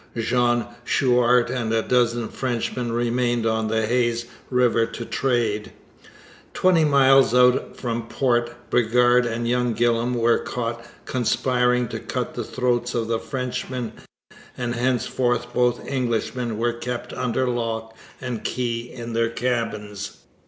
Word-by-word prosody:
Jean 120 +1 +1 0.2
Chouart 125 -1 +3
and 120 -3 -2
a 115 -1 +1
dozen 120 -2 +1
Frenchmen 120 -1 -2
remained 120 0 0
on 110 -1 +1
the 110 0 +1
Hayes 120 0 +1 0.2
river 125 -2 +3
to 115 +1 -7
trade. 115 -6 -1 0.8
Twenty 180 -3 +4
miles 135 -3 +5
out 125 0 +3
from 115 -2 -3
port, 120 -2 -1
Bridgar 120 +1 +4
and 120 -1 -1
young 125 -1 +1
Gillam 120 +1 +1
were 115 0 +3
caught 115 -1 -4 0.2
conspiring 125 0 +1
to - - -4
cut - - -4
the - - -3
throats 125 -1 -1
of 115 -1 -1
the 115 -1 +1
Frenchmen, 125 -2 -4 0.6
and 120 -1 -2
henceforth 120 0 0
both 125 -1 +1
Englishmen 120 -2 -2
were 120 +1 0
kept 120 +1 -5
under 125 +1 -1
lock 115 -2 -3 0.2
and 125 -4 -5
key 120 -1 -2
in 120 -1 -7
their 115 0 +1
cabins. 115 -4 -3
120 Hz, 130 wpm, -23 LUFS, 115-125 Hz, 0.8 s, miles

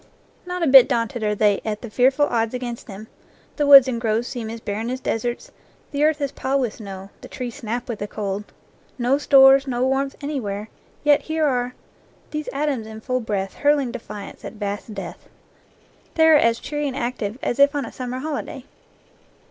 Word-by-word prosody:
Not 360 -1 -3
a - - +2
bit 265 -2 +8
daunted 235 -2 -1
are 210 -1 0
they 205 -1 +2
at 215 0 -4
the 235 - -6
fearful 265 +5 +3
odds 230 -2 -1
against 240 -2 -6
them; 210 +2 -9 0.5
the 295 -2 +1
woods 275 -2 +10
and 235 -3 -2
groves 225 +1 0
seem 230 -3 -5
as 230 +1 -6
barren 220 +2 -4
as 255 +1 -3
deserts, 240 -1 -3 0.4
the 285 0 0
earth 310 0 +3
is 280 -1 -1
piled 270 +1 -1
with 235 -4 -1
snow, 195 -2 -9
the - - -10
trees 245 -2 -6
snap 235 +3 -4
with 235 -4 -5
the 205 - -4
cold 205 -1 -4 0.5
no 255 +3 +1
stores, 270 -1 +6
no 250 -1 0
warmth 270 +1 0
anywhere, 225 -8 -4 0.3
yet 295 -1 +4
here 315 0 -1
are 250 -3 -1 0.6
"these 305 0 -4
atoms 275 -6 -2
in 220 0 -9
full 255 +3 -2
breath 200 -4 -3
Hurling 290 -3 +1
defiance 210 -4 -9
at - - -7
vast 205 0 -5
death." 195 - -8 0.9
They 320 0 +5
are 315 - +7
as 230 -5 +4
cheery 295 0 -3
and 270 -1 -4
active 240 -4 -3
as 240 - -2
if 280 +1 +5
on 285 -3 -1
a - - -8
summer 255 0 -5
holiday. 275 -2 -5
245 Hz, 195 wpm, -22 LUFS, 220-275 Hz, 0.9 s, woods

